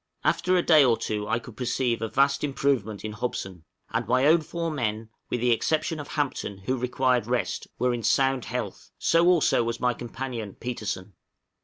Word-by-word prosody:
After 180 +4 +2
a 175 - +2
day 155 -4 +6
or 120 -4 +4
two 105 -1 -3
I - - +1
could 120 -1 -10
perceive 125 -1 -1
a 115 - -1
vast 140 +3 +2
improvement 135 -8 0
in 110 - -3
Hobson; 95 -6 -5 0.3
and - - -1
my 130 +3 +3
own 160 +3 +5
four 165 +1 -3
men, 110 -6 -2 0.2
with 120 - -2
the 125 0 +3
exception 155 +7 0
of 145 - -6
Hampton, 135 -9 -2
who 115 +7 -2
required 125 -2 +1
rest, 115 -6 -1
were 125 0 +1
in 120 - -3
sound 135 +1 +2
health; 115 -5 -5
so 165 +1 +3
also 175 -8 +4
was 115 0 -3
my 125 0 +2
companion 120 -3 -6
Petersen. 105 -5 -4
125 Hz, 185 wpm, -26 LUFS, 110-140 Hz, 0.3 s, day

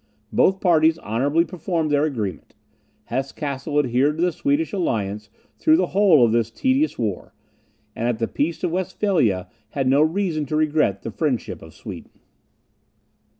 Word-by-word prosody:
Both 190 0 +3
parties 160 -3 +4
honourably 140 +8 0
performed 165 -2 -2
their 145 +1 +3
agreement. 110 -9 -4 0.5
Hesse 130 +5 -3
Cassel 145 0 -4
adhered 140 +2 +2
to 170 - 0
the 180 - +2
Swedish 285 - -1
alliance 105 - -2 0.3
during 315 0 +4
the - - +2
whole 185 -10 +5
of 115 - +1
this 115 -1 +1
tedious 260 - 0
war; 105 -5 -4 0.6
and 115 - -2
at 120 -2 0
the 115 0 -1
peace 160 +5 -2
of 180 - 0
Westphalia 180 - 0 0.2
had 135 +2 -2
no 135 +3 +4
reason 160 -2 0
to 155 - -2
regret 150 -10 +1
the 115 - -5
friendship 135 0 -2
of - - -13
Sweden. - - -10
150 Hz, 155 wpm, -22 LUFS, 120-175 Hz, 0.6 s, whole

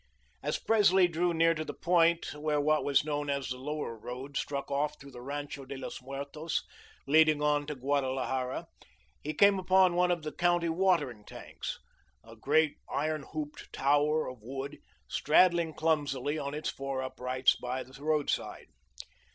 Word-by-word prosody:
As - - -1
Presley 190 -4 +4
drew 175 +1 0
near 165 0 +3
to 155 -1 -3
the - - -7
point 170 -1 +2
where 150 0 -1
what 155 +1 +2
was 140 0 +2
known 145 -1 -2
as 140 -1 -1
the 125 0 -4
Lower 150 -3 -4
Road 125 +5 -8
struck 140 0 -3
off 150 +2 -1
through 140 0 -12
the 120 -1 -10
Rancho 145 +1 -5
de 135 +1 -7
Los 130 - -7
Muertos, 140 +4 -4 0.4
leading 155 +1 +5
on 145 -1 +2
to 150 - -4
Guadalajara, 130 -1 -1 0.6
he 155 +1 -4
came 200 +1 +5
upon 185 -1 +4
one 180 0 +3
of 175 -3 0
the 155 - -4
county 175 0 +1
watering 160 - +1
tanks, - - -7 0.5
a 115 - -13
great, 150 +6 +2
iron 155 +1 -1
hooped 150 -1 -6
tower 145 +3 +2
of 125 -3 -8
wood, 135 +5 -6 0.3
straddling 170 0 +3
clumsily 145 -3 0
on 140 0 -4
its 155 - -2
four 135 -1 -4
uprights 130 0 +1
by 125 +1 -4
the 135 +2 -15
roadside. 155 -2 -1
145 Hz, 160 wpm, -30 LUFS, 135-160 Hz, 0.6 s, leading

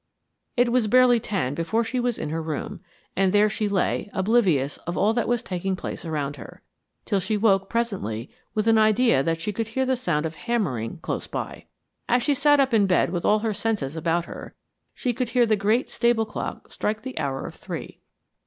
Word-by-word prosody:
It 240 0 +3
was 245 -3 +2
barely 250 +1 +5
ten 190 - -2
before 170 +9 0
she 250 +3 -2
was 245 -2 0
in 150 - -4
her 165 +1 -2
room, 155 -2 -4 0.4
and 190 -1 +3
there 210 +1 +4
she 215 -1 -1
lay, 200 +1 0
oblivious 190 - +2
of 175 - -2
all 215 +2 +3
that 240 0 0
was 240 -1 0
taking 190 +1 -2
place 180 - -6
around 145 -3 -3
her, 120 - -12 0.4
till 200 - +1
she 205 +3 -1
woke 195 -3 +2
presently 190 - -2 0.2
with 215 0 +1
an 225 -1 +5
idea 215 - +4
that 165 +3 -1
she 205 +5 -3
could 225 +2 -2
hear 265 +4 -1
the 260 0 +2
sound 170 -11 -1
of 160 - -3
hammering 180 - -2
close - - -3
by. - - -5 0.4
As 245 0 +3
she 290 - +3
sat 290 +1 +4
up 270 -2 +2
in 205 -3 +4
bed 180 -2 +2
with 175 -2 -2
all 210 - +5
her 220 - +1
senses 200 -11 -2
about 165 +1 0
her, - - -9 0.4
she 245 - -1
could 245 +1 -2
hear 245 0 +3
the 220 -1 +3
great 215 +5 +1
stable 235 -2 +1
clock 215 - -6
strike 215 +1 -2
the 260 -9 -5
hour 135 -3 -2
of - - -7
three. - - -7
210 Hz, 210 wpm, -24 LUFS, 170-235 Hz, 0.4 s, barely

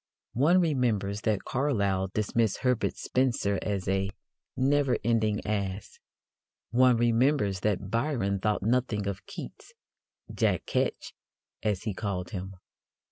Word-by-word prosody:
One 155 +9 +4
remembers 115 - 0
that 110 -3 0
Carlyle 100 -9 0
dismissed 110 +2 0
Herbert 125 -3 +1
Spencer 120 -6 0
as 100 -3 -2
a 95 0 +1 0.5
"never 135 0 +2
ending 110 -3 +1
ass." 100 -2 -3 0.7
One 125 0 +5
remembers 120 -3 +2
that 100 -1 -1
Byron 115 -6 0
thought 105 0 0
nothing 115 -2 +1
of 100 -1 -4
Keats - - -9 0.6
"Jack - - +1
Ketch," - - -1 0.5
as 105 -4 -1
he 110 -3 -2
called 95 -3 -3
him. 95 0 -6
105 Hz, 120 wpm, -28 LUFS, 100-125 Hz, 0.7 s, One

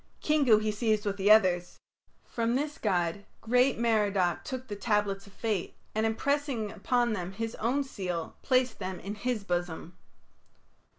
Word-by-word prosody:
Kingu 285 -8 +4
he 215 0 0
seized 215 -1 0
with 200 -1 -1
the 200 +1 +2
others. 185 -5 +4 0.5
From 235 0 -1
this 290 +2 -2
god 180 -2 0 0.2
great 250 +3 +3
Merodach 205 -6 +1
took 260 -2 -6
the 205 - -5
tablets 205 -1 0
of 200 - -16
fate, 215 -5 -2 0.2
and 220 +1 +1
impressing 255 -1 -1
upon 240 0 +1
them 185 -2 -4
his 225 +3 -4
own 255 +6 +1
seal, 180 -10 -4
placed 255 -2 +1
them 185 -2 -4
in 200 +3 -5
his 215 0 -2
bosom. 175 -2 -3
215 Hz, 155 wpm, -29 LUFS, 195-245 Hz, 0.5 s, Kingu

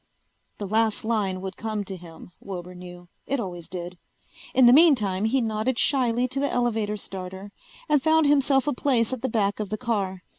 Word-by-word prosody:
The 205 - -5
last 220 +1 +1
line 200 -5 -1
would 190 0 -6
come 215 -2 -3
to 195 -1 -7
him, 170 -1 -12
Wilbur 180 -2 -7
knew. 175 0 -11 0.2
It 275 0 -1
always 175 -6 -6
did. 175 -1 -7 0.6
In 260 - +6
the 240 - +8
meantime 225 - +4
he 255 +4 +2
nodded 225 +2 -1
shyly 250 -3 +2
to 265 +2 -3
the 280 - 0
elevator 220 -4 0
starter 190 0 -8 0.4
and 295 -2 +3
found 320 +1 +3
himself 275 -2 +3
a 295 - 0
place 245 -2 +1
at 255 - -4
the 260 - -1
back 205 -3 0
of 210 -2 -3
the 215 - -3
car. 200 -6 -2
215 Hz, 190 wpm, -25 LUFS, 190-255 Hz, 0.6 s, the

